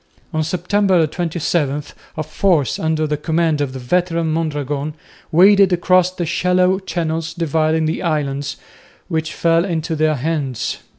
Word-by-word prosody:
On 155 0 0
September 180 +1 +2
27 155 -3 -1 0.3
a 155 - -1
force 165 -4 +1
under 160 -1 0
the 150 -1 -1
command 160 0 0
of 140 -2 -1
the 130 - -7
veteran 165 +5 0
Mondragon 150 -2 -2 0.4
waded 195 +3 +6
across 180 +1 +3
the 180 -2 -4
shallow 180 +3 +2
channels 165 -3 -3
dividing 160 -1 +1
the 155 - -2
islands, 145 -4 -2 0.5
which 160 -2 -2
fell 165 0 +2
into 165 -3 -2
their 155 0 +2
hands. 140 -3 -2
160 Hz, 135 wpm, -19 LUFS, 150-175 Hz, 0.5 s, waded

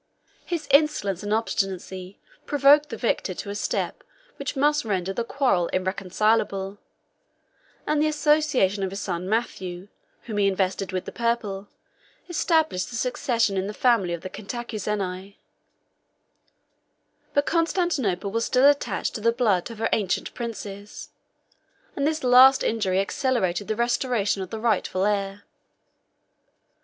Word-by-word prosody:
His 340 -3 -3
insolence 275 - +3
and 205 0 -4
obstinacy 190 -3 -2 0.3
provoked 290 +1 +5
the 230 - -5
victor 205 -5 -1
to 200 - -6
a - - -3
step 205 - -2 0.3
which - - -4
must 295 +2 +2
render 195 -3 -1
the 235 - -2
quarrel 240 -9 +1
irreconcilable; 195 +1 0 1.1
and 300 -1 +1
the 310 - +3
association 295 - +2
of 190 - -1
his 195 +1 -6
son 180 -2 -3
Matthew, 190 -4 -3 0.3
whom 215 -3 -4
he 200 - +4
invested 195 0 -1
with 185 -1 -3
the - - -6
purple, 225 -4 -2 0.6
established 320 - +1
the 240 - -7
succession 240 -4 0
in 190 +1 -1
the 210 - -6
family 230 -8 +2
of 170 - -11
the 185 - -6
Cantacuzeni. 205 -4 -4 2.0
But 285 0 +3
Constantinople 325 - 0
was 230 +2 0
still 255 +1 +3
attached 285 0 +1
to 215 - -5
the 230 +2 +3
blood 225 -7 +1
of 230 - -9
her 225 - 0
ancient 200 -5 -1
princes; 210 -4 -7 0.9
and 280 0 0
this 310 -1 -1
last 255 +2 +7
injury 195 -4 +1
accelerated 200 -4 0
the 215 - -1
restoration 235 -4 0
of 185 - -5
the 220 - -5
rightful 210 -4 0
heir. 200 -1 -1
215 Hz, 135 wpm, -25 LUFS, 195-255 Hz, 2.0 s, last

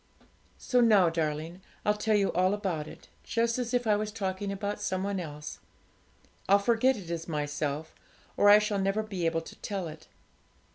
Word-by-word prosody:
'So 250 -2 +2
now, 210 -7 +5
darling, 160 +2 -3 0.2
I'll 210 - +4
tell 215 +1 +1
you 200 -1 +2
all 185 +2 +2
about 180 -7 -3
it, - - -12 0.2
just 230 +1 0
as 240 -1 -2
if 245 -1 +1
I 215 -1 +4
was 210 +1 -2
talking 195 -2 -3
about 200 +1 -3
some 190 -2 -1
one 200 -1 -1
else; 150 -3 -7 0.9
I'll 200 - +7
forget 235 +5 +2
it 175 -4 -8
is 165 -1 -4
myself, 150 0 -3 0.4
or 205 - +5
I 205 - +10
shall 210 -1 0
never 195 +3 0
be 190 -6 -2
able 165 0 0
to - - -11
tell 195 -4 -4
it. 155 0 -11
195 Hz, 185 wpm, -29 LUFS, 165-210 Hz, 0.9 s, I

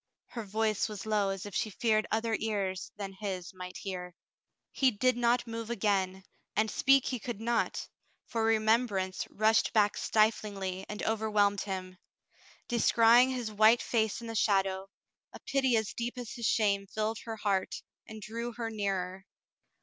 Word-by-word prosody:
Her 230 - -5
voice 215 +1 0
was 210 0 -7
low 210 -2 +1
as 195 0 -4
if 205 - -8
she 215 - 0
feared 215 +1 +1
other 225 0 0
ears 200 -4 -2
than 195 -2 -5
his 190 -2 -5
might 180 0 -8
hear. 180 -3 -6 0.6
He 265 - +3
did 255 +2 +1
not 240 0 +2
move 230 -1 -6
again, 195 -4 0 0.3
and 215 +1 +1
speak 270 0 +4
he 250 - -2
could 240 -2 -5
not, 235 +1 -1 0.4
for 230 -2 -2
remembrance 220 -4 +1
rushed 220 +2 +2
back 210 -2 +3
stiflingly 200 -3 0
and 210 - -5
overwhelmed 210 -2 +1
him. 185 -2 -5 0.7
Descrying 235 +1 +5
his 245 -4 -3
white 215 +3 +5
face 220 +1 0
in - - -8
the 225 - -5
shadow, 195 -3 +1 0.4
a - - -9
pity 265 -3 +1
as 220 -2 -2
deep 240 +2 -4
as 245 -2 -6
his 235 -2 -2
shame 200 -3 +2
filled 215 +2 -2
her 225 -1 -4
heart 200 -3 -1 0.2
and 220 -1 -9
drew 235 +2 -5
her 230 -1 -4
nearer. 190 -2 -3
215 Hz, 160 wpm, -30 LUFS, 195-230 Hz, 0.7 s, Descrying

